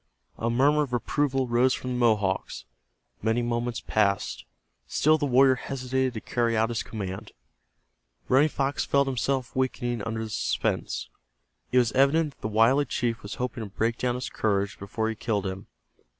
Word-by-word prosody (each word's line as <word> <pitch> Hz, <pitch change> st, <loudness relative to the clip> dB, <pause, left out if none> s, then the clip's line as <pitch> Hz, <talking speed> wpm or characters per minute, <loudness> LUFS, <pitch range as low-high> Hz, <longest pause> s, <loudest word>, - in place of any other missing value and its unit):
A 115 Hz, -, 0 dB
murmur 140 Hz, +5 st, +3 dB
of 135 Hz, -4 st, -3 dB
approval 135 Hz, +2 st, 0 dB
rose 120 Hz, +2 st, +3 dB
from 125 Hz, -, -5 dB
the 125 Hz, -, -1 dB
Mohawks. 105 Hz, -5 st, +1 dB, 0.6 s
Many 110 Hz, +3 st, +1 dB
moments 120 Hz, 0 st, -2 dB
passed. 100 Hz, -2 st, 0 dB, 0.4 s
Still 155 Hz, +1 st, +3 dB
the 145 Hz, -, 0 dB
warrior 130 Hz, +1 st, +5 dB
hesitated 130 Hz, -1 st, -2 dB
to 110 Hz, -, -4 dB
carry 115 Hz, -2 st, 0 dB
out 110 Hz, +1 st, +2 dB
his 115 Hz, -2 st, -1 dB
command. 95 Hz, -3 st, -6 dB, 0.9 s
Running 140 Hz, +4 st, +4 dB
Fox 140 Hz, -1 st, -1 dB
felt 140 Hz, 0 st, +2 dB
himself 130 Hz, -1 st, -1 dB
weakening 120 Hz, -3 st, -1 dB
under 115 Hz, +1 st, -3 dB
the 110 Hz, -, -6 dB
suspense. -, -, -1 dB, 0.6 s
It 125 Hz, -, +2 dB
was 120 Hz, -3 st, +4 dB
evident 145 Hz, +4 st, +3 dB
that -, -, -36 dB
the -, -, -2 dB
wily 115 Hz, +7 st, +4 dB
chief 120 Hz, -3 st, -2 dB
was 100 Hz, +1 st, -7 dB
hoping 125 Hz, -2 st, -3 dB
to 105 Hz, -, -7 dB
break 115 Hz, +4 st, -1 dB
down 125 Hz, -1 st, 0 dB
his 125 Hz, -, -4 dB
courage 100 Hz, -2 st, -1 dB
before 110 Hz, +3 st, -2 dB
he 110 Hz, -, -1 dB
killed 105 Hz, -2 st, -1 dB
him. 95 Hz, 0 st, -5 dB
120 Hz, 170 wpm, -26 LUFS, 110-130 Hz, 0.9 s, warrior